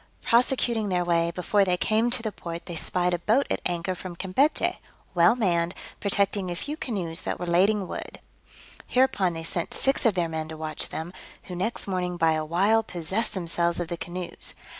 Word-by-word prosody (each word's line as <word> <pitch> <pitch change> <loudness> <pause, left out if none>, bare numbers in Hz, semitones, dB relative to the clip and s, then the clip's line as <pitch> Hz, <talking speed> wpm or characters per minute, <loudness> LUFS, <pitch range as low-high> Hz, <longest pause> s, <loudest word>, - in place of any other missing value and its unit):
Prosecuting 235 -3 +2
their 180 -1 +1
way, 170 -1 +2
before 180 +4 +2
they 180 -2 +1
came 220 +5 +2
to 240 -1 +2
the 215 - -2
port 170 -3 -7
they 175 - -6
spied 180 +2 0
a 175 - 0
boat 225 +10 +2
at - - 0
anchor 175 +1 -2
from 180 -1 -7
Campechy, 195 - +1 0.3
well 175 +6 +5
manned, 175 -6 +1 0.2
protecting 200 -1 +1
a 175 - -3
few 290 - -4
canoes 185 - -3
that - - -3
were 175 - -3
lading 190 +3 +3
wood: - - -7 0.7
hereupon 205 -8 +2
they 165 0 -5
sent 165 +1 -2
six 270 0 +2
of 210 - +2
their 175 -2 +1
men 160 -1 -3
to 160 0 -7
watch 155 0 -3
them, 165 +3 -5 0.3
who 180 - -7
next 220 +7 -2
morning, 180 -2 -1
by 165 -1 +4
a 155 0 -1
wile, 195 +8 +3
possessed 200 +3 -1
themselves 170 -1 +1
of 175 -2 -3
the 170 - -2
canoes. 175 0 -6
180 Hz, 195 wpm, -26 LUFS, 170-215 Hz, 0.7 s, well